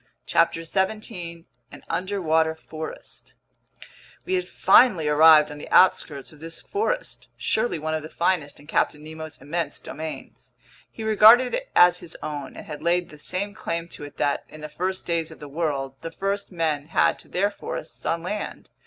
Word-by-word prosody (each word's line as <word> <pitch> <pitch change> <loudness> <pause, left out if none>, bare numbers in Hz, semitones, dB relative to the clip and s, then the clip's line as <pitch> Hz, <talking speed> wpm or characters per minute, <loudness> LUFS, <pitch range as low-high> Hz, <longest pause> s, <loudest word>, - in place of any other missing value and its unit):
CHAPTER 165 0 +2
17 190 -2 -3 0.3
An 145 - -12
Underwater 165 -3 0
Forest 160 0 -9 0.9
WE 370 - -2
HAD 365 -1 0
FINALLY 185 -12 +5
arrived 150 0 +7
on 150 - -8
the - - -9
outskirts 150 -6 +3
of 150 - -17
this 165 +1 -7
forest, - - -3
surely 220 -4 0
one 155 +1 -3
of 155 - -1
the 155 - -9
finest 170 -5 -1
in 145 - -16
Captain 150 -1 0
Nemo's 155 0 -8
immense 150 +1 -3
domains. 155 +2 -8 0.4
He 225 - -8
regarded 220 +4 +7
it - - -3
as 175 0 +7
his 160 - -10
own 145 -2 -5
and - - -9
had 150 -2 -7
laid 175 +1 +1
the 150 - -14
same 200 +6 -2
claim 170 -4 -4
to - - -9
it 145 0 -10
that, 145 - 0
in 155 - -12
the 155 - -6
first 185 +4 -3
days 165 -2 -1
of 160 - -12
the 150 - -9
world, 140 -3 -2
the 165 - -5
first 200 +4 -3
men 155 -4 -1
had 160 - +2
to - - -12
their 200 +3 0
forests 165 -5 -7
on 165 0 -1
land. 205 +4 -5
165 Hz, 180 wpm, -24 LUFS, 155-190 Hz, 0.9 s, arrived